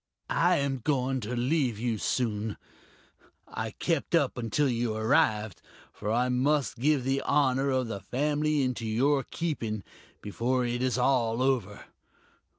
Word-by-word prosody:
"I 175 +2 +3
am 140 -3 -1
going 130 0 0
to 120 +2 -4
leave 125 -2 +1
you 115 -1 -2
soon.... 110 -3 -1 0.9
I 110 0 -4
kept 165 +7 -1
up 145 -6 +2
until 120 +5 0
you 120 -3 -1
arrived, 110 -2 +1 0.3
for 105 - -4
I 120 +2 +2
must 130 +1 +1
give 145 0 +2
the 135 +1 0
honor 140 -1 +2
of 130 -2 0
the 110 -3 -4
family 145 +7 0
into 125 -3 -2
your 135 +6 +2
keeping, 120 -10 -3 0.4
before 125 +5 -1
it 120 +1 -2
is 130 -1 +1
all 125 -2 +2
over.... 115 -7 -1
125 Hz, 145 wpm, -28 LUFS, 115-140 Hz, 0.9 s, I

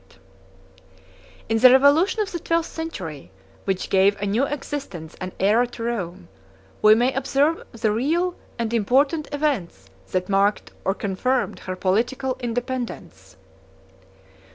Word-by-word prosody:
] - - -26
In 225 - +2
the 255 - +9
revolution 285 - +5
of 395 - -8
the 345 - -4
twelfth 335 0 -1
century, 180 - -6 0.4
which 190 -2 -2
gave 195 +1 +4
a 205 - -2
new 220 +7 +1
existence 270 - -6
and 185 0 -6
æra 220 +5 +3
to 240 -1 -8
Rome, 190 -6 -4 0.5
we 215 0 +7
may 245 +3 +2
observe 275 +4 +1
the 225 -2 0
real 325 +11 0 0.2
and 230 -1 -2
important 275 +8 +2
events 210 - -2 0.2
that 185 0 -1
marked 200 +1 +1
or 195 - 0
confirmed 235 +7 -1
her 185 - -5
political 245 +8 0
independence. 245 0 -5
235 Hz, 130 wpm, -23 LUFS, 195-275 Hz, 0.5 s, the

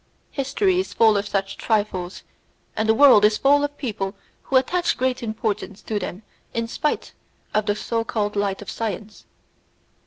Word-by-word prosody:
History 360 +8 +1
is 375 - -3
full 220 -2 +5
of 200 0 0
such 195 -1 -2
trifles, 205 -5 -1 0.5
and 220 0 0
the 220 - +5
world 260 -6 +7
is 210 0 +5
full 285 +3 +4
of 290 0 -3
people 200 -6 -3 0.3
who 270 - -3
attach 350 +7 +2
great 255 0 0
importance 215 -3 -3
to 215 -2 -2
them 185 +2 -6 0.3
in 230 0 -1
spite 300 +6 -2 0.4
of 215 0 +1
the 205 - +2
so 230 +1 -2
called 210 -2 -2
light 200 -1 -1
of - - -7
science. 215 -1 -5
220 Hz, 165 wpm, -23 LUFS, 205-260 Hz, 0.5 s, world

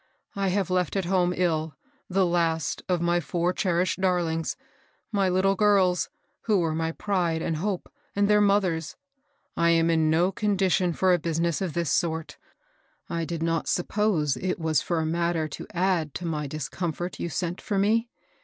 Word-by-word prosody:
I 195 -1 0
have 190 0 0
left 180 -1 0
at 195 -2 0
home, 180 -1 +2
ill, 160 -4 0 0.3
the 190 0 +2
last 165 -3 0
of 180 -2 +1
my 175 0 +2
four 175 +2 -1
cherished 185 0 0
darlings, 170 -3 0 0.3
— - - -39
my 200 -3 +2
little 190 +2 +3
girls, 195 -3 +3 0.4
who 215 -3 +3
were 165 -2 0
my 160 +1 -1
pride 175 -5 -1
and 160 - -1
hope, 190 +2 -2 0.3
and 200 0 +3
their 210 0 +4
mothr 200 -2 +3
er's. 160 -1 -8 0.6
I 170 0 +3
am 165 0 +3
in 160 -1 +2
no 170 +4 +3
condition 190 -3 +1
for 185 +2 +3
a 175 - +2
business 165 +1 -1
of 180 -5 -2
this 170 -3 -1
sort. 160 -2 -1 0.7
I 165 -1 -1
did 165 -1 -4
not 165 -1 0
suppose 175 -6 +1
it 185 -1 -2
wa3 160 -2 +1
for 170 -2 -1
a - - -1
mat 170 +2 0
ter 160 -1 0
to - - -8
add 175 -5 0
to 180 - -4
my 150 -3 -2
discomfort 160 +4 -4
you 170 - -2
sent 175 +3 -3
for 205 - -2
me. 225 +4 +2
175 Hz, 185 wpm, -26 LUFS, 165-190 Hz, 0.7 s, their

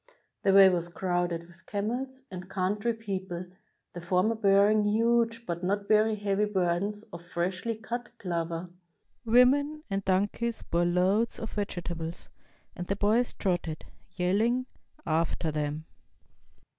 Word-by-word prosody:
The 195 - +3
way 195 0 +9
was 175 -2 +1
crowded 175 -1 -1
with 170 0 -20
camels 250 +6 -3
and 185 0 -7
coimtry 205 +5 -1
peo 200 -4 -2
ple, 180 -1 -6 0.5
the 175 - -7
former 185 +6 +2
bearing 210 0 +4
huge 230 +2 +2
but 170 -1 -4
not 200 +2 -1
very 215 0 +4
heavy 205 0 0
burdens 200 +1 0
of 170 0 -8
freshly 180 +6 -2
cut 240 +2 -5
clover. 170 -2 -3 0.5
Women 280 +6 +4
and 195 0 -1
donkeys 205 +5 0
bore 170 +1 +1
loads 185 +6 +2
of 225 - -5
vegetables, 175 -4 -4 0.5
and 180 -3 -5
the 200 - 0
boys 215 +5 +2
trotted, 175 -4 -2 0.3
yelling, 220 +8 +1 0.4
after 160 0 0
them. 150 +1 -3
195 Hz, 130 wpm, -29 LUFS, 175-220 Hz, 0.5 s, way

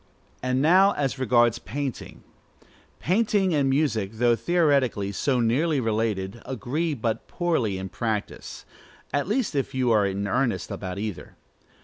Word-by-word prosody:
And 130 +1 0
now 190 +5 +5
as 135 -2 -2
regards 120 -2 +3
painting: 135 +3 -6 0.8
painting 195 0 +1
and 140 -3 +2
music, 135 -8 0
though 120 +1 +3
theoretically 140 - +1
so 125 +5 0
nearly 140 +7 +1
related, 110 -2 -2
agree 145 +6 -2
but 115 -2 -3
poorly 145 - -1
in 95 0 -5
practice; 110 +1 -4 0.5
at 145 +3 0
least, 220 0 0
if 135 -2 -2
you 125 -2 +2
are 105 -3 +3
in 100 +1 -2
earnest 125 +4 -1
about 95 -1 -5
either. 105 -2 -6
125 Hz, 135 wpm, -25 LUFS, 110-150 Hz, 0.8 s, now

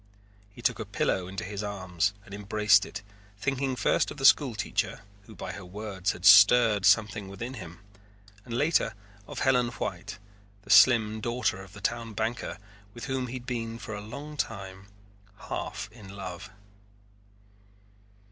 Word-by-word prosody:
He 100 - -14
took - - +1
a - - -4
pillow 90 -2 -1
into 95 +1 -5
his 100 +1 -5
arms 100 -1 -2
and 100 - -12
embraced 105 0 +3
it 100 0 -8 0.3
thinking 135 +3 -1
first 115 - +1
of - - -8
the 135 - -2
school 135 -4 +5
teacher, - - -2 0.3
who 110 - -12
by - - -6
her 100 - -8
words 95 0 -3
had 90 - -8
stirred 105 0 +7
something 105 0 +3
within 120 +7 -6
him, 90 -7 -10 0.6
and 120 -1 -5
later 145 -6 +2 0.3
of - - -6
Helen 125 -2 +3
White, 100 -2 -5 0.5
the - - -6
slim 110 -4 +6
daughter 120 -3 -1
of 95 0 -13
the 105 - -11
town 115 +2 -2
banker, 110 -1 -3 0.4
with 120 - -7
whom 130 -2 -2
he 125 - -6
had 125 -1 -7
been 115 -3 -4
for 110 0 -7
a 105 - -5
long 140 +8 -8
time 95 -5 -5 0.6
half - - -4
in 105 -4 -13
love. 100 0 -7
105 Hz, 160 wpm, -28 LUFS, 100-120 Hz, 0.6 s, stirred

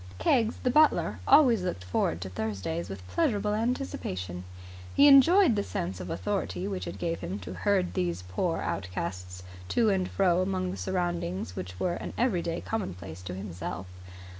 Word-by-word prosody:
Keggs, 225 - +2
the 250 - +2
butler, 305 +3 +3
always 245 -9 +6
looked 180 - -3
forward 90 -2 -1
to 95 - -4
Thursdays 95 -3 -3
with 95 -1 -8
pleasurable 205 - +1
anticipation. 150 - -3 0.5
He 285 - +7
enjoyed 290 - +7
the 205 - +1
sense 90 - -4
of 90 0 -6
authority 200 -2 -2
which 195 -2 -4
it - - -6
gave 170 -1 -2
him 95 - -4
to 90 0 -7
herd 190 - +1
these 90 0 -1
poor 165 - -1
outcasts 90 -1 -4 0.2
to 230 - +2
and 185 -2 0
fro 180 -2 +2
among 185 -1 -1
the - - -6
surroundings 175 - -2
which 90 0 -6
were 175 - 0
an - - -6
everyday 175 -8 0
commonplace 90 - -5
to 90 0 -6
himself. 90 -1 -5
170 Hz, 165 wpm, -28 LUFS, -, 0.5 s, He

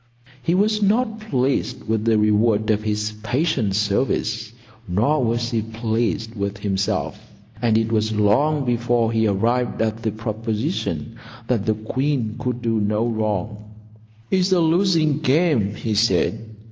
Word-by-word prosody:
He 170 +4 +1
was 210 +2 +2
not 220 +2 +1
pleased 135 - -1
with 110 0 0
the 115 -1 +3
reward 105 0 +2
of 105 0 +1
his 105 0 -2
patient 125 - 0
service; 105 +1 0 0.4
nor 115 +11 +1
was 120 +1 -1
he 115 -2 0
pleased 110 -1 -2
with 100 -2 -3
himself; 100 -1 -2 0.4
and 115 -2 +3
it 115 0 0
was 110 -1 +1
long 135 +8 +2
before 120 -1 +1
he 110 -1 +2
arrived 120 +5 0
at 110 0 -1
the 115 - 0
proposition 115 - -3 0.3
that 115 -4 -1
the 110 - +2
queen 120 +1 -2
could 125 -1 -3
do 115 -1 +1
no 105 +2 0
wrong. 110 -2 -2 0.7
"It's 185 0 +2
a 185 - +4
losing 165 -3 +2
game," 145 - +2
he 110 0 -3
said. 110 +1 +1
115 Hz, 145 wpm, -22 LUFS, 110-130 Hz, 0.7 s, a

